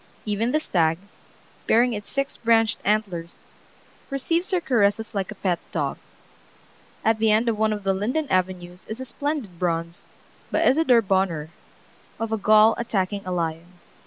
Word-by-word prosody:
Even 215 +3 0
the 305 - +2
stag, 165 - +1 0.7
bearing 240 +2 +4
its 205 -1 -6
six 275 0 -2
branched 225 -2 +2
antlers, 195 -5 -2 0.7
receives 330 +6 -1
her 370 -3 +2
caresses 225 -6 +1
like 195 -3 -2
a 215 - -7
pet 185 -3 -1
dog. - - -2 1.1
At 220 0 +3
the 220 0 +3
end 220 +3 +3
of 220 -2 0
one 220 0 +2
of 210 -1 -3
the 195 0 +2
linden 250 +11 -1
avenues 180 -1 -1
is 220 +3 -7
a 260 - -5
splendid 260 - -4
bronze, 170 -1 -2 0.4
by - - +1
Isadore 260 -5 +4
Bonheur, 190 -6 0 0.7
of 225 0 -3
a 220 - +1
Gaul 215 +2 +5
attacking 200 -3 -1
a - - -2
lion. 170 0 -3
215 Hz, 160 wpm, -24 LUFS, 185-235 Hz, 1.1 s, Gaul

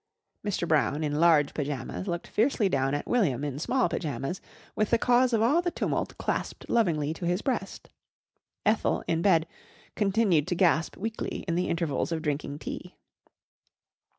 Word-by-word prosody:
Mr. 200 -4 -1
Brown 155 -1 +2
in 150 0 -1
large 160 -4 +4
pyjamas 145 +4 -4
looked 175 -1 -3
fiercely 225 -2 +1
down 135 -4 +1
at 145 - -3
William 150 - +1
in 145 -1 -3
small 255 +10 +1
pyjamas 150 +2 -3 0.3
with 215 -1 +1
the 235 - +4
cause 250 +2 +3
of 225 -2 +2
all 290 +9 +4
the 350 - 0
tumult - - -2
clasped - - -3
lovingly 160 -10 +1
to 170 +1 -4
his 180 +3 0
breast. 240 -7 -3 0.8
Ethel, - - +2
in 165 0 +1
bed, 170 -4 +4 0.5
continued 195 -7 +2
to 180 - 0
gasp 170 -3 +2
weakly 225 +3 -4
in 170 - 0
the 180 +2 0
intervals 165 -2 -1
of 160 -1 -2
drinking 145 -1 -2
tea. 140 - -7
170 Hz, 160 wpm, -28 LUFS, 150-215 Hz, 0.8 s, large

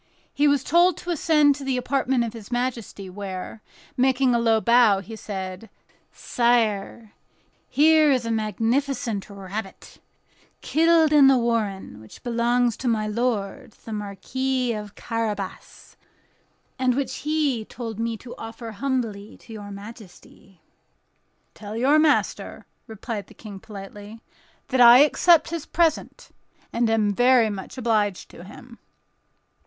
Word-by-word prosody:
He 290 +1 +2
was 285 -2 +2
told 345 +3 +3
to 355 - -5
ascend 300 -3 +3
to 280 0 -9
the 265 -1 -1
apartment 260 -1 0
of 230 -1 -5
his 225 -1 -11
majesty, 240 -5 -3
where, 190 +2 -7 0.3
making 260 -1 +2
a 235 - +2
low 225 -1 +3
bow, 235 -3 +4
he 220 +4 -9
said: 190 0 -7 0.4
"Sire, 225 -3 0 0.6
here 310 0 +4
is 255 -3 +1
a 230 - -2
magnificent 225 +1 -1
rabbit, 195 0 -8 0.6
killed 320 0 +3
in 285 -2 +7
the 270 -1 +5
warren, 215 - -2
which 110 - -15
belongs 240 0 +1
to 260 - -4
my 220 -2 +1
lord 215 -2 -3
the 225 - -6
Marquis 245 +5 -2
of 210 -1 -7
Carabas, 215 -4 -5 0.8
and 255 -1 +2
which 275 0 -3
he 295 -6 -1
told 225 -1 -8
me 230 0 -2
to 240 +2 -11
offer 225 0 -8
humbly 220 -4 -4
to 225 - -14
your 205 -2 -9
majesty." 200 -3 -13 0.9
"Tell 210 +1 -8
your 280 +6 +4
master," 305 -1 0 0.2
replied 220 -2 -6
the - - -17
King, 205 -3 -10
politely, 205 +2 -11 0.5
"that 255 -1 +2
I 240 0 +9
accept 315 +2 +4
his 335 -2 -5
present, 330 -2 -1 0.4
and 235 -1 +1
am 215 -2 +1
very 245 -1 +4
much 195 +5 -8
obliged 215 -6 -1
to 170 - -12
him." 235 +5 -14
230 Hz, 135 wpm, -23 LUFS, 210-260 Hz, 0.9 s, I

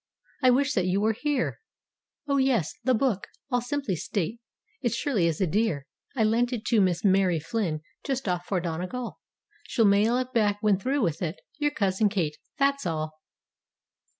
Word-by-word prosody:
I 255 - +6
wish 280 +3 +3
that 185 -3 +1
you 185 +2 +2
were 220 +2 +2
here. 290 +3 -1 0.7
Oh, 280 -1 +2
yes, 260 - +2
the 255 +1 +3
book, 220 -5 0 0.2
I'll 245 -1 +2
simply 270 -5 -2
state, 195 +6 -2 0.4
it 240 - 0
surely 235 -8 +1
is 160 -2 -1
a 190 - +3
dear. 175 -6 0 0.3
I 230 - +2
lent 235 +3 +2
it 240 -2 -4
to 225 -4 +4
Miss 180 0 +1
Mary 190 -3 +4
Flynn, 165 -2 -2 0.2
just 270 -3 -2
off 180 -1 -1
for 190 - +1
Donegal— 180 +9 -4 0.5
She'll 230 - +2
mail 210 +4 +4
it 255 0 -3
back 210 -4 +2
when 205 -3 +3
through 265 +5 0
with 165 -4 -1
it. 170 0 -3 0.2
Your 295 0 +2
Cousin 205 -5 +1
Kate—that's 210 - -1
all." 155 -1 -2
210 Hz, 175 wpm, -27 LUFS, 180-250 Hz, 0.7 s, I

